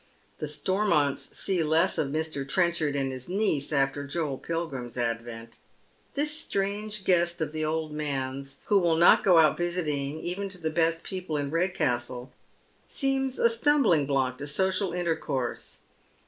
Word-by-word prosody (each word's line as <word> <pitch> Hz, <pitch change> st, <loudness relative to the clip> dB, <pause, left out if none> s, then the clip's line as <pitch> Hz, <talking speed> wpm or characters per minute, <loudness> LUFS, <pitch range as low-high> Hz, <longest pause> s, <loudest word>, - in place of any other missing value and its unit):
The 150 Hz, -, -3 dB
Stormonts 155 Hz, -2 st, +1 dB
see 190 Hz, -3 st, 0 dB
less 160 Hz, +2 st, +2 dB
of 155 Hz, -, +1 dB
Mr. 155 Hz, -1 st, -2 dB
Trenchard 170 Hz, -4 st, +1 dB
and 135 Hz, -1 st, -1 dB
his 130 Hz, +2 st, -7 dB
niece 185 Hz, -8 st, +1 dB
after 140 Hz, 0 st, 0 dB
Joel 145 Hz, -2 st, -2 dB
Pilgrim's 140 Hz, -8 st, -4 dB
advent. 115 Hz, -1 st, -4 dB, 0.6 s
This 295 Hz, +1 st, +2 dB
strange 205 Hz, -5 st, -1 dB
guest 175 Hz, -1 st, +2 dB
of 155 Hz, -2 st, -2 dB
the 155 Hz, 0 st, -3 dB
old 155 Hz, 0 st, -2 dB
man's, 135 Hz, -2 st, -4 dB
wlio 200 Hz, -2 st, +4 dB
will 170 Hz, -2 st, +2 dB
not 170 Hz, +2 st, +6 dB
go 180 Hz, -3 st, +5 dB
out 155 Hz, -2 st, +5 dB
visiting, 155 Hz, -5 st, -2 dB
even 195 Hz, +3 st, -3 dB
to 190 Hz, -, -6 dB
the 160 Hz, -2 st, -3 dB
best 165 Hz, 0 st, +1 dB
people 180 Hz, -5 st, -4 dB
in 140 Hz, -1 st, -3 dB
Redcastle, 130 Hz, -8 st, -1 dB, 0.6 s
eeems 270 Hz, -1 st, 0 dB
a -, -, -1 dB
etumblingblock 155 Hz, -, +2 dB
to 145 Hz, -, -5 dB
social 190 Hz, +4 st, +2 dB
intercourse. 160 Hz, -8 st, -3 dB
160 Hz, 145 wpm, -27 LUFS, 140-180 Hz, 0.6 s, not